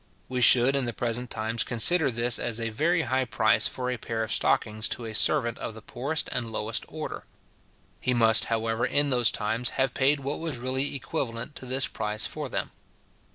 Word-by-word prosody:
We 125 -1 -3
should 125 +3 +7
in 140 -2 0
the 120 - -3
present 120 +2 -2
times 110 +1 -1
consider 145 +6 +4
this 120 0 +1
as 120 -1 -1
a 115 0 -2
very 165 +9 +1
high 130 -2 0
price 125 - +2
for 125 -1 -4
a 125 - -3
pair 110 0 -3
of 110 - -2
stockings 110 0 0
to 120 - -3
a 110 - -6
servant 115 +2 +2
of 110 - -6
the 110 - -10
poorest 140 +8 -3
and 120 -2 -3
lowest 110 +1 -2
order. 155 0 -7 0.7
He 125 - 0
must 115 -2 +5
however, 115 0 -2
in 145 +2 +1
those 120 -2 +4
times, 115 +2 -2
have 135 0 +1
paid 140 +2 +2
what 140 +2 -4
was 160 -5 -4
really 130 +3 0
equivalent 130 -2 -4
to 130 - -10
this 130 +1 +1
price 105 0 -2
for - - -5
them. - - -3
120 Hz, 200 wpm, -26 LUFS, 115-135 Hz, 0.7 s, should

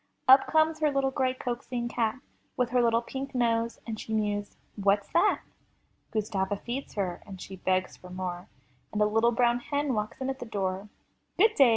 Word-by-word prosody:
Up 265 +1 +8
comes 315 0 +3
her 305 -1 +3
little 275 -1 +1
gray, 260 -1 +1
coaxing 240 -1 -3
cat. 235 +1 -1 0.4
With 250 -2 +1
her 250 -1 +4
little 230 0 +3
pink 270 +2 -6
nose, 230 -1 +1
and 220 -2 -4
she - - -7
mews, 205 -1 -1 0.2
What's 200 0 +2
that?*' 380 +5 +3 0.7
Gustava 205 -3 0
feeds 250 +5 -5
her 185 -4 -2
— 195 - -7
she 190 +1 -8
begs 185 0 0
for 180 - -13
more, 180 0 -5 0.4
And 210 - -2
a 210 - +5
little 225 +3 +3
brown 240 0 +3
hen 285 +2 -1
walks 210 -1 -3
in 265 0 -1
at 265 - -7
the - - -5
door. 195 -1 -2 0.5
'*Good 435 +4 +5
day!" 275 - +6
230 Hz, 190 wpm, -29 LUFS, 205-260 Hz, 0.7 s, Up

